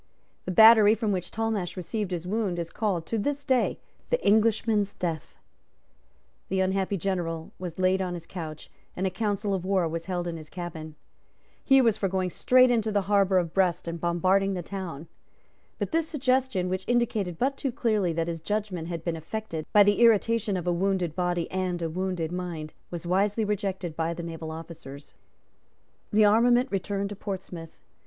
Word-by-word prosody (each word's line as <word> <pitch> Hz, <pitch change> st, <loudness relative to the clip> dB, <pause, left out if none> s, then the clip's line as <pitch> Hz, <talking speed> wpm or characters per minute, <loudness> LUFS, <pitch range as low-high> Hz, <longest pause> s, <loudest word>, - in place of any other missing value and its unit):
The -, -, -2 dB
battery 220 Hz, +2 st, +8 dB
from 220 Hz, -2 st, -1 dB
which 185 Hz, -2 st, -2 dB
Talmash 220 Hz, -5 st, -2 dB
received 190 Hz, +3 st, -3 dB
his 175 Hz, -2 st, -4 dB
wound 200 Hz, -2 st, -1 dB
is 170 Hz, -1 st, -4 dB
called, 195 Hz, -7 st, -1 dB
to 225 Hz, -, -2 dB
this 285 Hz, +6 st, -2 dB
day, 260 Hz, -3 st, +2 dB, 0.3 s
the -, -, +2 dB
Englishman's 215 Hz, -1 st, +2 dB
Death. 165 Hz, -3 st, -4 dB, 1.1 s
The 190 Hz, -, 0 dB
unhappy 190 Hz, +1 st, 0 dB
general 170 Hz, -3 st, -3 dB
was 180 Hz, -3 st, -6 dB
laid 185 Hz, +1 st, +2 dB
on 180 Hz, -1 st, -2 dB
his 170 Hz, -1 st, -8 dB
couch; 160 Hz, -4 st, -8 dB, 0.3 s
and 185 Hz, -, -1 dB
a 190 Hz, -, 0 dB
council 205 Hz, 0 st, -1 dB
of 190 Hz, -2 st, -2 dB
war 190 Hz, -2 st, +1 dB
was 165 Hz, +1 st, -5 dB
held 175 Hz, -2 st, -2 dB
in 170 Hz, -1 st, -4 dB
his 155 Hz, -1 st, -11 dB
cabin. 160 Hz, -3 st, -7 dB, 0.7 s
He 270 Hz, -1 st, +5 dB
was 225 Hz, -3 st, +3 dB
for 195 Hz, -, 0 dB
going 185 Hz, -1 st, -1 dB
straight 255 Hz, +5 st, +4 dB
into 225 Hz, -2 st, +1 dB
the 205 Hz, -1 st, +2 dB
harbour 195 Hz, -1 st, +3 dB
of 170 Hz, -2 st, 0 dB
Brest 185 Hz, -3 st, +1 dB
and 170 Hz, -1 st, -4 dB
bombarding 185 Hz, +3 st, +2 dB
the 180 Hz, -, -4 dB
town. 170 Hz, -5 st, -6 dB, 0.7 s
But -, -, -3 dB
this 325 Hz, -1 st, +1 dB
suggestion, 260 Hz, -, +1 dB
which 185 Hz, +1 st, -3 dB
indicated 215 Hz, -7 st, 0 dB
but 270 Hz, +6 st, 0 dB
too 270 Hz, -1 st, -2 dB
clearly 215 Hz, -7 st, +1 dB
that 165 Hz, 0 st, -1 dB
his 165 Hz, -1 st, -4 dB
judgment 200 Hz, -3 st, -3 dB
had 170 Hz, -2 st, -5 dB
been 170 Hz, -2 st, -1 dB
affected 165 Hz, -1 st, -5 dB
by 210 Hz, -, +7 dB
the 205 Hz, +2 st, +2 dB
irritation 225 Hz, -2 st, +3 dB
of 180 Hz, -, -4 dB
a 175 Hz, -, +1 dB
wounded 180 Hz, -2 st, 0 dB
body 175 Hz, -2 st, 0 dB
and 185 Hz, -2 st, -1 dB
a 165 Hz, -2 st, -3 dB
wounded 180 Hz, -2 st, -2 dB
mind, 175 Hz, -4 st, -5 dB, 0.2 s
was 175 Hz, -1 st, -6 dB
wisely 200 Hz, +5 st, +1 dB
rejected 195 Hz, -5 st, -2 dB
by 165 Hz, +1 st, -1 dB
the 170 Hz, -, -6 dB
naval 165 Hz, -1 st, -6 dB
officers. 160 Hz, -3 st, -9 dB, 1.0 s
The 215 Hz, 0 st, +5 dB
armament 240 Hz, +4 st, +4 dB
returned 200 Hz, +1 st, -2 dB
to 205 Hz, -, -6 dB
Portsmouth. 185 Hz, -5 st, -7 dB
190 Hz, 180 wpm, -27 LUFS, 170-210 Hz, 1.1 s, battery